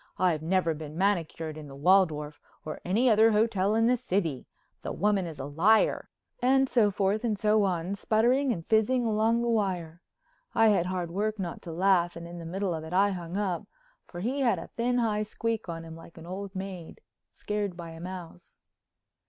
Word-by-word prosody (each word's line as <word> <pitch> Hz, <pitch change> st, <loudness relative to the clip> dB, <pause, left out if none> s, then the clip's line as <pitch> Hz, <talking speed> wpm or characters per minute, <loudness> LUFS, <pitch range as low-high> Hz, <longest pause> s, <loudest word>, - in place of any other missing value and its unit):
I've 175 Hz, -4 st, +2 dB
never 170 Hz, 0 st, +1 dB
been 155 Hz, 0 st, -8 dB
manicured 165 Hz, -5 st, -1 dB
in 150 Hz, -, -9 dB
the 135 Hz, -, -11 dB
Waldorf—or 155 Hz, -2 st, 0 dB
any 220 Hz, +8 st, +2 dB
other 220 Hz, -1 st, +5 dB
hotel—in 215 Hz, 0 st, +2 dB
the 250 Hz, +2 st, +4 dB
city. 185 Hz, -, -2 dB, 0.3 s
The -, -, -4 dB
woman 200 Hz, -3 st, +1 dB
is 160 Hz, -3 st, -8 dB
a 135 Hz, -, -5 dB
liar——" 175 Hz, +10 st, +2 dB, 0.3 s
and 265 Hz, +2 st, +4 dB
so 230 Hz, -5 st, +3 dB
forth 200 Hz, +2 st, 0 dB
and 220 Hz, -3 st, 0 dB
so 210 Hz, +1 st, +3 dB
on, 180 Hz, 0 st, -1 dB
sputtering 240 Hz, +7 st, +2 dB
and 165 Hz, -7 st, -4 dB
fizzing 230 Hz, +3 st, +2 dB
along 225 Hz, +2 st, +2 dB
the -, -, -1 dB
wire. 185 Hz, -7 st, -1 dB, 0.5 s
I 225 Hz, -1 st, +5 dB
had 185 Hz, -4 st, +2 dB
hard 180 Hz, -2 st, -3 dB
work 215 Hz, +4 st, -1 dB
not 180 Hz, -4 st, -5 dB
to 170 Hz, -, -8 dB
laugh 175 Hz, 0 st, +2 dB
and 170 Hz, 0 st, -8 dB
in 175 Hz, 0 st, -8 dB
the 165 Hz, -, -8 dB
middle 190 Hz, +1 st, -2 dB
of 160 Hz, -1 st, -4 dB
it 160 Hz, +2 st, -8 dB
I 200 Hz, +2 st, +4 dB
hung 175 Hz, 0 st, -5 dB
up, 190 Hz, -5 st, -2 dB, 0.4 s
for 175 Hz, -, -8 dB
he 255 Hz, +7 st, -1 dB
had 250 Hz, -4 st, +2 dB
a -, -, -6 dB
thin, 245 Hz, +1 st, -1 dB
high 220 Hz, -3 st, +1 dB
squeak 220 Hz, -1 st, -3 dB
on 165 Hz, 0 st, -5 dB
him 160 Hz, 0 st, -9 dB
like 165 Hz, +1 st, -14 dB
an 165 Hz, -, -10 dB
old 190 Hz, +2 st, -6 dB
maid 190 Hz, -3 st, -7 dB, 0.3 s
scared 205 Hz, -4 st, -3 dB
by 170 Hz, -2 st, -7 dB
a 165 Hz, -, -10 dB
mouse. 175 Hz, -1 st, -9 dB
190 Hz, 195 wpm, -28 LUFS, 170-215 Hz, 0.5 s, other